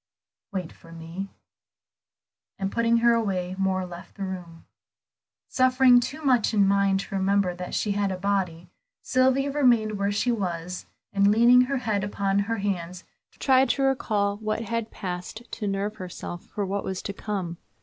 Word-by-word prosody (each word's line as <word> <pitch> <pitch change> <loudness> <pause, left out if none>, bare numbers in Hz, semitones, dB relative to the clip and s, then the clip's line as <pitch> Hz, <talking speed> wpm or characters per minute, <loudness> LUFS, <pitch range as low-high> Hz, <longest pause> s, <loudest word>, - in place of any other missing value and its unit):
"Wait 185 -4 -4
for 165 - -17
me," 165 +4 -7 1.3
and 195 0 -2
putting 230 0 +2
her 235 - +6
away, 190 -5 -1
Moor 190 -1 +1
left 175 -1 -11
the 200 - -5
room. 180 -3 -7 0.8
Suffering 255 -1 +5
too 270 +6 -5
much 245 -5 +3
in 200 -2 +5
mind 195 -1 +3
to - - -10
remember 195 -1 +2
that 180 0 -6
she 210 - 0
had 200 -1 0
a 185 - -3
body, 180 -3 -2 0.3
Sylvia 265 +2 +2
remained 235 -7 +2
where 200 0 +1
she 215 +4 +1
was, 180 -4 -3 0.3
and 200 0 +4
leaning 240 +3 +6
her 275 +2 -1
head 215 -5 -1
upon 200 -1 0
her 225 +3 -1
hands 185 -3 -3 0.3
tried 265 -1 +4
to 275 - +1
recall 210 -7 +1
what 215 +1 -2
had 230 0 -3
passed, 180 +4 -6
to 210 - -4
nerve 200 +2 -2
herself 175 -2 -7
for 205 - -3
what 195 +1 -2
was 190 -1 -4
to 200 - -4
come. 190 -5 -4
200 Hz, 165 wpm, -26 LUFS, 185-230 Hz, 1.3 s, her